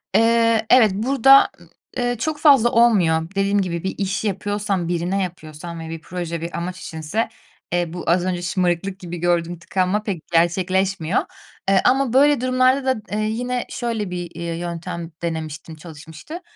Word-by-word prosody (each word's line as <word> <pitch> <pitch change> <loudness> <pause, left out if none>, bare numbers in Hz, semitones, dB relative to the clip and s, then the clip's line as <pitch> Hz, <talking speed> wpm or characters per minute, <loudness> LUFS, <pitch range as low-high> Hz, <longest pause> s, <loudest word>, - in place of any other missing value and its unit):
Eee, 230 -1 +3
evet, 230 -5 +6
burada, 270 +5 +5 0.5
eee, 245 0 0
çok 310 +3 -2
fazla 275 -7 +6
olmuyor. 180 -9 +3
Dediğim 200 +1 +2
gibi, 170 -2 -3
bir 190 - -3
iş 200 +2 -2
yapıyorsam, 200 -2 -2
birine 175 +3 -1
yapıyorsam 170 -1 -7
ve 160 0 -7
bir 165 -1 -6
proje, 170 -1 -5
bir 170 +1 -5
amaç 180 +2 -4
içinse, 160 +9 -3 0.4
eee, 175 -2 0
bu 175 - -6
az 175 +1 +2
önce 180 -1 -2
şımarıklık 180 +1 -1
gibi 175 -1 -7
gördüğüm 175 0 0
tıkanma 185 +4 -1
pek 190 -7 -5
gerçekleşmiyor, 185 +1 +1 0.5
eee, 195 -1 +4
ama 265 -2 +3
böyle 285 0 +4
durumlarda 255 +1 +2
da, - - -9
eee, 210 - -1
yine 245 +2 -2
şöyle 230 -5 -3
bir, 175 -1 -5
iii, 170 -1 -4
yöntem 170 -1 -5
denemiştim, 160 -1 -5
çalışmıştı: 160 - -10
185 Hz, 155 wpm, -21 LUFS, 170-225 Hz, 0.5 s, evet